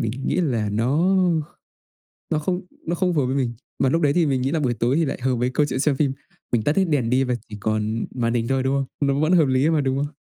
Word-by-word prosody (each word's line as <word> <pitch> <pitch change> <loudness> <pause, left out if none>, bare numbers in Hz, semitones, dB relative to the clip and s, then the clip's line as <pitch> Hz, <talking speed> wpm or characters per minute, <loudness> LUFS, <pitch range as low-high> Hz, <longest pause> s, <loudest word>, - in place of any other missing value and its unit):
mình 110 - -1 0.2
nghĩ - - 0
là 120 -10 0
nó 140 - +2 0.9
kh - - -8
nó 155 - +1
không 180 +4 -2 0.3
nó 170 - 0
không 180 0 0
phù 150 - +2
hợp 125 - 0
với 130 - -1
mình. 125 -4 0 0.3
Mà 135 - +3
lúc 165 +5 +1
đấy 145 -3 +3
thì 170 0 +3
mình 135 -3 0
nghĩ 135 +2 0
là 160 - 0
buổi 125 -4 0
tối 120 +4 0
thì 165 +1 +2
lại 135 - -3
hợp 130 0 +1
với 125 +1 0
câu 145 +3 +1
chuyện 130 - -3
xem 145 0 +2
phim. 135 -1 +1 0.4
Mình 115 -3 +1
tắt 150 - 0
hết 190 - +4
đèn 140 -8 0
đi 130 +2 +3
và 125 - -1 0.2
chỉ 105 - -7
còn 110 +1 -1
màn 115 -2 -1
hình 115 -1 0
thôi, 135 -1 0
đúng 135 +1 +1
không? 135 -1 0 0.2
Nó 140 0 +1
vẫn 155 +4 +2
hợp 165 -4 +5
lý 130 +4 +2
mà, 160 -2 +2
đúng 135 -1 0
không? 145 +1 -3
135 Hz, 290 wpm, -22 LUFS, 125-155 Hz, 0.9 s, hợp